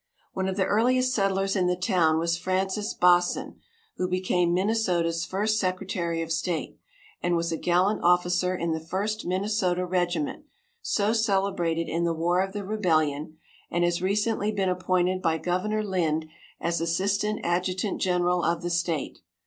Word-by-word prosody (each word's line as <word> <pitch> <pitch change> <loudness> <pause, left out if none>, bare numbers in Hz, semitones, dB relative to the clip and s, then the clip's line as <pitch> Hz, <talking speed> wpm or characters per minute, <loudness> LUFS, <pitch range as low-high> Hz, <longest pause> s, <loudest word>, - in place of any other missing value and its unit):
One 190 0 -1
of 190 - -2
the 190 - +2
earliest 255 +4 +2
settlers 195 -2 +1
in 185 -2 +2
the 180 - +2
town 175 -4 +2
was 170 +1 +1
Francis 190 +4 -1
Baasen, 175 0 +2 0.4
who 180 - 0
became 180 -1 +1
Minnesota's 180 -4 +1
first 215 +3 0
secretary 185 -3 -2
of 165 - -7
state, 165 +1 -2 0.4
and 175 0 +1
was 170 0 -1
a - - 0
gallant 180 +5 +1
officer 180 +1 +2
in 170 -2 -2
the 160 - -1
First 195 +7 -3
Minnesota 185 -1 0
Regiment, 180 - -1 0.4
so 210 - +1
celebrated 195 -6 0
in 170 +1 -1
the 170 -1 0
War 175 +3 +1
of 195 0 -2
the 205 -1 -4
Rebellion, 155 -7 0 0.3
and 175 - 0
has 175 0 +1
recently 210 +2 0
been 195 -3 0
appointed 185 0 0
by 165 -2 +1
Governor 200 +6 -1
Lind 165 -6 0 0.3
as 170 0 -1
assistant 200 +5 0
adjutant 185 +3 -1
general 180 -1 +1
of 170 0 0
the 175 - -2
state. 170 -4 -1
180 Hz, 155 wpm, -26 LUFS, 170-195 Hz, 0.4 s, the